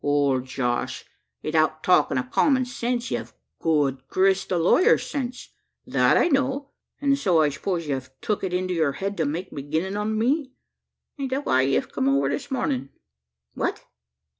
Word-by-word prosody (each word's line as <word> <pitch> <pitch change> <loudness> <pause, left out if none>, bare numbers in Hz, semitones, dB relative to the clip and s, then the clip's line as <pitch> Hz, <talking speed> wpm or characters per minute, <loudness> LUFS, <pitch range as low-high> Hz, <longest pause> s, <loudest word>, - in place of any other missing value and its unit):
"Wal, 145 -2 +2
Josh, 125 -1 -2 0.4
'ithout 155 0 +1
talkin' 180 -7 +3
o' 130 - +1
common 260 - +2
sense, 245 0 -2
ye've - - -4 0.3
good 145 -5 +1
grist 190 0 +2
o' 180 - +2
lawyers' 355 - +4
sense 255 -3 -5 0.4
that - - +3
I - - +4
know; 275 -2 0 0.3
an' 280 -1 +3
so, 190 -12 +2
I 155 -1 +4
suppose, 170 +3 -3
ye've 130 -2 -3
tuk 210 - -2
it 190 - -1
into 185 0 -1
your 160 -5 +1
head 200 +5 -3
to 160 - +1
make 170 +6 -3
beginnin' 155 +7 -2
on 210 +1 -1
me. 265 +4 0 0.7
Aint 270 -1 -2
that 270 +2 -2
why 130 - +3
ye've 135 +1 0
come 135 - +1
over 135 0 +2
this 145 - -3
mornin'?" 135 - -1 0.6
"What?" - - -3
180 Hz, 165 wpm, -24 LUFS, -, 0.7 s, lawyers